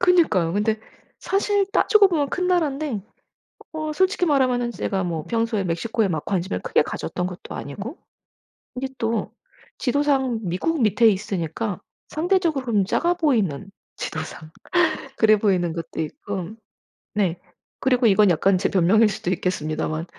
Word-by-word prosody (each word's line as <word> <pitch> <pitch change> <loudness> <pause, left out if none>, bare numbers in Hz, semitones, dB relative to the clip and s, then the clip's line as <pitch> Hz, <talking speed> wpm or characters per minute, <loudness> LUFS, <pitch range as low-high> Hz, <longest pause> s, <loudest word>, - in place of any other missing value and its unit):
그니까요. 325 - +3
근데 215 +2 +1 0.4
사실 400 0 +1
따지고 420 -1 +5
보면 300 -6 0
큰 365 +4 -1
나라인데 295 - 0 0.7
어 310 -1 -3
솔직히 375 +2 +2
말하면은 255 -5 +2
제가 195 -4 -2
뭐 165 -3 -3
평소에 225 -3 0
멕시코에 205 +5 0
막 160 -5 -2
관심을 180 - -1
크게 - - +2
가졌던 180 - -3
것도 180 -1 -8
아니고, 200 - -6 0.8
근데 265 +1 -3
또 225 -2 -1 0.5
지도상 265 -3 +1
미국 215 - -1
밑에 215 +2 +4
있으니까 195 0 -2 0.3
상대적으로는 310 - +1
작아 340 - +1
보이는, 220 - 0 0.3
지도상 155 0 -6 0.7
그래 215 -1 +5
보이는 185 -5 +1
것도 165 -1 -5
있고 180 +3 -5 0.7
네. 185 -5 0 0.4
그리고 250 -2 +3
이건 210 -1 +5
약간 185 +3 +3
제 185 - 0
변명일 200 +4 +4
수도 215 -1 -4
있겠습니다만 155 -3 -2
220 Hz, 320 characters per minute, -23 LUFS, 185-285 Hz, 0.8 s, 따지고